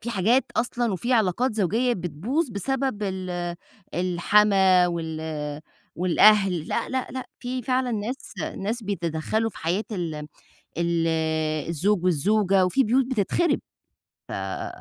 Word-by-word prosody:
في 235 - -3
حاجات 230 +6 +3
أصلًا 240 -2 0
وفي 240 +7 -1
علاقات 225 +2 +2
زوجية 225 +5 +1
بتبوظ 195 - -2
بسبب 255 +1 -2
ال 180 -3 -3 0.4
الحَمَاة 185 +1 +4
وال 160 -2 -4 0.7
والأهل 185 -1 +4
لأ، - - -1
لأ، 260 -1 -2
لأ 260 -1 -5
في 250 0 -3
فعلًا 255 0 0
ناس، 225 +6 -4 0.2
ناس 220 +4 -3
بيتدخلوا 195 +3 -1
في - - -12
حياة 180 +6 -1
ال 170 -5 -3 0.6
ال 170 -1 +1 0.6
الزوج 180 +4 +1
والزوجة، 190 +2 +3
في 270 +9 +2
بيوت 250 +3 +2
بتتخرب. 260 - +1 1.1
ف - - -4
205 Hz, 120 wpm, -25 LUFS, 175-240 Hz, 1.1 s, الحَمَاة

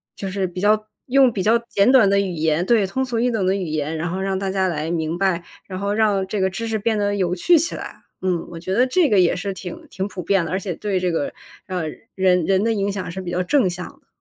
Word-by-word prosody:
就 195 - -5
是 190 0 -1
比 180 +1 -7
较 215 +2 +2 0.2
用 265 -1 +5
比 205 - -3
较 225 +4 +4
简 200 +5 +4
短 245 -7 +6
的 200 0 +3
语 195 -2 -1
言 160 +1 0
对， 220 -1 +3
通 260 +8 -1
俗 240 -3 -2
易 245 +2 +2
懂 215 -5 0
的 190 +1 +2
语 195 -2 -2
言， 155 0 -2
然 165 +2 -2
后 185 - -3
让 190 0 -1
大 195 0 -2
家 190 -1 +1
来 160 -2 -2
明 165 0 -1
白， 185 -3 +1 0.2
然 185 -1 -5
后 200 +1 -1
让 210 -3 +2
这 205 +1 -2
个 190 - +2
知 225 +5 -4
识 225 - -1
变 220 +1 0
得 205 0 0
有 180 -3 0
趣 335 - +4
起 330 +2 0
来。 - - -9 0.2
嗯， 180 -3 0
我 170 - -7
觉 185 +3 -3
得 250 +6 +3
这 320 +3 +3
个 205 -4 +4
也 175 -1 +3
是 195 +2 -3
挺 180 -1 -8
挺 190 +2 -3
普 190 -3 -7
遍 195 0 +2
的， - - -5
而 185 - 0
且 190 -2 -4
对 200 +2 -2
这 180 -1 0
个， 160 -4 -2 0.3
呃， 185 -3 -2 0.3
人 180 -3 +3
人 195 +2 +2
的 225 - +2
影 200 -1 0
响 190 -3 -4
是 190 +2 -5
比 180 - -6
较 180 +1 -1
正 235 0 +2
向 180 0 -5
的。 - - -19
190 Hz, 300 characters per minute, -21 LUFS, 180-210 Hz, 0.3 s, 短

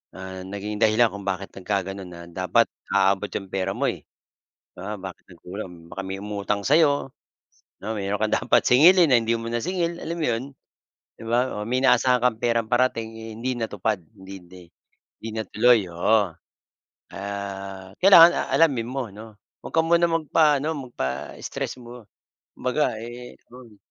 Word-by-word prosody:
ah, 95 0 -8
naging 100 +2 -5
dahilan 110 +2 +4
kung 100 0 -8
bakit 95 +1 -3
nagkaganoon 95 0 -3
na 85 -1 -10
dapat 90 0 +2 0.3
aabot 100 +1 +2
'yong 95 -1 -5
pera 95 0 -1
mo - - +1
eh. - - -11 0.8
Oo 95 +4 -5
bakit 95 -1 -9
nagkulang 90 -1 -9
baka 95 - -5
may 95 0 -5
umutang 105 0 -2
sa 145 - +4
'yo, 145 -4 +2 0.7
oo 110 - -3
mayroon 100 +1 -2
kang 110 - +2
dapat - - +4
singilin 170 +6 +6
na 125 - +7
hindi 115 +1 0
mo 115 0 -6
nasingil 170 +7 -2
alam 165 - -4
mo 155 - 0
'yon, 115 +1 -1 0.8
'di - - -10
ba, 120 +2 0
oh, - - -4
may 125 +2 0
inaasahan 125 -2 +4
kang 125 -3 +2
perang 115 -2 0
parating, 120 -2 +1
eh, 110 0 -8
hindi 125 +2 -2
natupad 110 -2 -1 0.2
hindi 95 +1 -11
hindi 90 +1 -14 0.6
hindi 115 - -5
na 110 - -2
tuloy 120 -1 +4
oo, 100 +2 +2 0.8
ah, 100 -1 -6
kailangan, 175 -3 +9
ah, - - -2
alamin 135 -8 +3
mo 135 -3 -3
'no, 110 +1 -12 0.3
'wag - - -8
ka 165 - +5
muna 170 +1 +3
magpaano 155 -2 +2 0.2
magpa-stress 65 - -5
mo, 120 -1 -11 0.5
kumbaga, 130 -3 -1
eh, 120 +1 -9
dun 120 -3 -14
110 Hz, 165 wpm, -24 LUFS, 95-125 Hz, 0.8 s, kailangan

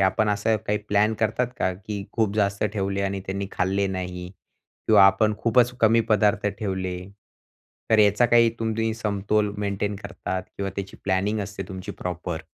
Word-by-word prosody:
आपण 100 +3 +2
असं 105 +2 +1
काही 105 0 +1
प्लॅन 105 +2 +3
करतात 110 +3 +1
का? 95 - +1
की 100 +1 -6
खूप 110 -3 0
जास्त 100 0 +1
ठेवले 100 -1 -1
आणि 100 0 -2
त्यांनी 100 +1 -3
खाल्ले 95 +2 0
नाही. 90 -1 -5 0.6
किंवा 105 -3 +7
आपण 105 +2 +3
खूपच 120 +1 +3
कमी 115 +1 +5
पदार्थ 105 0 +2
ठेवले. 95 -3 -2 0.9
तर 110 - +5
याचा 105 +3 +5
काही 115 -1 +5
तुम्ही 110 0 -1
समतोल 105 -1 0
मेंटेन 100 0 -2
करतात? 95 -1 -5
किंवा 100 0 -3
त्याची 100 -1 -5
प्लॅनिंग 100 +3 0
असते 100 0 -5
तुमची 95 -1 -6
प्रॉपर? 90 -2 -5
100 Hz, 155 wpm, -24 LUFS, 95-110 Hz, 0.9 s, किंवा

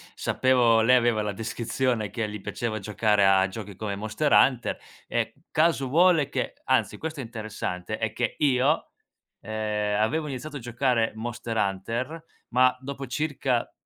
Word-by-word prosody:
sapevo 120 -3 +3
lei 125 +3 +5
aveva 120 -3 +3
la 105 -1 -2
descrizione 115 +1 -1
che 110 +3 -2
gli 105 - -6
piaceva 110 0 -3
giocare 105 0 +2
a 95 0 +5
giochi 100 0 -8
come 100 +1 -4
Monster 110 +8 -1
Hunter 125 -3 +4 0.3
e - - -1 0.2
caso 155 -4 +2
vuole 165 0 +4
che 130 -3 -3
anzi 130 - +1
questo 160 -1 -5
è 135 - -3
interessante 110 -4 -5
è 110 -1 -2
che 120 0 -1
io, 140 +1 +2 0.5
ehm, 105 -1 -1
avevo 150 +8 0
iniziato 145 +2 -6
a - - -7
giocare 120 -1 0
Monster 115 0 -4
Hunter 115 +11 -2 0.3
ma 125 +1 +4
dopo 140 0 -6
circa 130 -2 -1
120 Hz, 150 wpm, -26 LUFS, 110-130 Hz, 0.5 s, lei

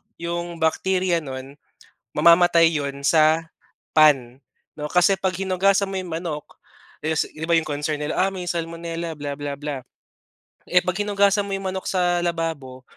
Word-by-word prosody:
yung 170 0 -4
bakteria 180 +2 +1
nun 135 -1 -8 0.6
mamamatay 170 -1 +5
yun 140 -2 -3
sa 160 +1 +4 0.4
pan, 135 -5 +4 0.4
'no. 150 - -3
Kasi 180 +2 +4
pag 190 -1 -1
hinugasan 195 +1 +2
mo 190 - -3
yung 180 -2 -8
manok 160 -3 -4 0.6
is 160 0 +1
iba 165 +2 -2
yung 160 - -2
concern 150 +1 -2
nila, 150 +1 -2
ah, 195 +1 +3
may 180 -1 -5
salmonella 165 0 -4
bla 145 -1 -4
bla 145 -1 -4
bla. 145 -3 -4 0.9
Eh, 180 0 +4
'pag 180 0 -2
hinugasan 200 0 +2
mo 195 - -4
yung 195 0 -6
manok 190 0 -5
sa 180 -2 +1
lababo 160 -7 -3
165 Hz, 155 wpm, -23 LUFS, 150-180 Hz, 0.9 s, mamamatay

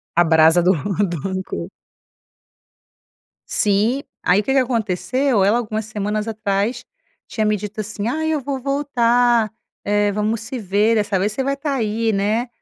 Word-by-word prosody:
A 175 - +5
brasa 160 +1 +5
do 180 +2 +4 0.4
do 175 -2 -4
rancor. 185 -1 -4 1.8
Sim, 215 +6 +1 0.2
aí 185 +3 +3
o - - -11
que 270 - 0
que 270 - +4
aconteceu? 240 0 0
Ela, 205 +4 +3
algumas 220 -2 -3
semanas 210 0 -3
atrás, 210 +1 -2 0.4
tinha 220 - -2
me 215 0 +2
dito 210 +2 -5
assim: 210 0 -5
"Ah, 310 +6 -1
eu 315 -1 0
vou 275 0 -4
voltar, 245 -5 +2 0.3
eh, 205 0 +1
vamos 215 +2 -1
se 245 +3 -6
ver. 205 +2 +2
Dessa 205 -3 +1
vez, 200 +3 0
você 265 +6 -2
vai 275 +1 -1
tá 285 0 -2
aí, 225 -2 0
né? 210 +5 0
215 Hz, 160 wpm, -20 LUFS, 200-245 Hz, 1.8 s, A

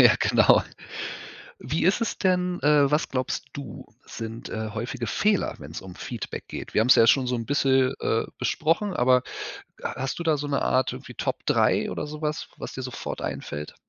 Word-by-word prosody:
Ja, - - +8
genau. - - +5 1.0
Wie 155 +4 -1
ist 195 +5 +3
es 230 - -1
denn 180 -1 +1
äh, 145 -1 +5
was 150 +2 +2
glaubst 130 +1 -2
du, 135 -7 -8 0.2
sind, 115 0 -7
äh, 110 0 -3
häufige 120 +2 -4
Fehler, 205 - +1
wenn's - - -8
um 95 -1 -10
Feedback 120 +1 -6
geht? - - -7
Wir - - +4
haben's 125 +4 +6
ja 115 - +6
schon 130 +1 +4
so 125 - +1
'n 115 -1 -3
bisschen, 135 -2 +3
äh, 115 - +1
besprochen. 165 - +1
Aber 125 -2 +4 0.6
ha - - -3
hast 135 +4 -3
du 170 - -2
da 160 -2 +2
so 145 +1 -3
'ne 140 -1 0
Art 130 0 +2
irgendwie - - -9
Top - - -3
3 - - +3
oder 150 - -3
sowas, 150 0 -3
was - - -7
dir 130 - -5
sofort 125 -1 -5
einfällt? 75 +1 -5
130 Hz, 190 wpm, -26 LUFS, 120-150 Hz, 1.0 s, Ja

